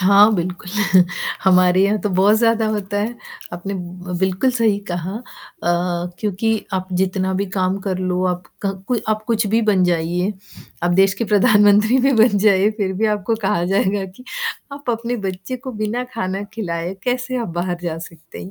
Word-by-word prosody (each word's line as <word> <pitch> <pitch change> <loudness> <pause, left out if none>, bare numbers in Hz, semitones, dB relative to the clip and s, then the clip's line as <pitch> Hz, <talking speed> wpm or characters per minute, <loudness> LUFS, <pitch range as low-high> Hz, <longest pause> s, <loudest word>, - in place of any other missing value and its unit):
हाँ, 200 +3 +6
बिल्कुल, 180 0 -4 0.7
हमारे 185 0 +5
यहाँ 205 +2 +2
तो 210 - 0
बहुत 195 +3 +4
ज़्यादा 225 -1 +2
होता 205 -2 -2
है, 220 +4 -2 0.4
आपने 180 +3 -5
ब 180 0 -6
बिल्कुल 190 +7 +1
सही 225 -5 +2
कहा 175 +1 -3
अ, 235 - -7 1.0
क्योंकि 215 +1 -1
आप 185 0 -2
जितना 190 +1 0
भी 200 +2 -1
काम 190 0 0
कर 190 -2 -2
लो 185 0 -1
आपका 180 +2 -3 0.2
को 250 - +2
आप 215 0 0
कुछ 225 -2 +1
भी 220 +3 +2
बन 200 -4 +3
जाइए, 175 +3 0 0.5
आप 175 - +2
देश 190 +1 +4
के 230 - -2
प्रधानमंत्री 210 +2 +4
भी 270 +2 +3
बन 225 -3 +4
जाइए 200 0 +4
फिर 195 -4 -1
भी 210 +4 0
आपको 210 +1 0
कहा 175 -3 +1
जाएगा 195 +1 +1
कि, 190 +7 -13 0.5
आप 280 -3 -4
अपने 235 +1 -2
बच्चे 185 +7 -5
को 260 +1 -8
बिना 215 +3 -2
खाना 190 -2 -2
खिलाए 175 -4 -3
कैसे 255 +1 -1
आप 230 - -5
बाहर 175 0 -2
जा 165 -2 -3
सकते 165 -1 -11
हैं, 185 - -9
195 Hz, 180 wpm, -20 LUFS, 185-220 Hz, 1.0 s, हाँ